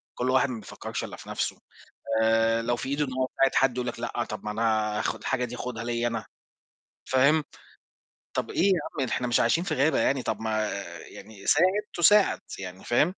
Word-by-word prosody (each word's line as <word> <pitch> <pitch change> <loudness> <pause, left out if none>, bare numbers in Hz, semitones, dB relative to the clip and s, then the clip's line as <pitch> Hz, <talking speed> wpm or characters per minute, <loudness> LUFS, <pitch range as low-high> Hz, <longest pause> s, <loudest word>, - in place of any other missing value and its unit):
كلّ 125 - -1
واحد 130 +1 +3
ما 120 -3 -4
بيفكّرش - - -6
إلا - - -6
في - - -12
نَفْسه، - - -2 0.7
آآ 115 0 +3
لو 120 +1 0
في 125 - -5
إيده 145 +1 +1
إن 130 - -6
هو 130 0 0
يساعد 135 0 +4
حد 130 -2 +3
يقول 125 0 -2
لك: 120 - -4
"لأ، 120 0 -2
طب 110 - -5
ما 105 - -2
أنا 110 -1 +1
آخُد - - -2
الحاجة 130 -2 -1
دي 125 0 -7
آخُدها 125 -2 -5
ليّا 120 0 -1
أنا" 115 -1 -3 0.8
فاهم، 140 +4 +3 0.9
طب - - -2
إيه - - 0
يا 190 -4 +3 0.2
عم، 130 - +1
إحنا 125 - -1
مش 120 - +2
عايشين 165 +9 +2
في 195 - -1
غابة 140 +4 +2
يعني، 135 -1 +2
طب - - -2
ما 110 -1 0 0.3
يعني 100 -1 -12
ساعد 160 +5 +5 0.3
تُساعَد 200 +4 +5 0.2
يعني، 95 -1 -8
فاهم؟ 120 - +4
120 Hz, 205 wpm, -27 LUFS, 115-135 Hz, 0.9 s, ساعد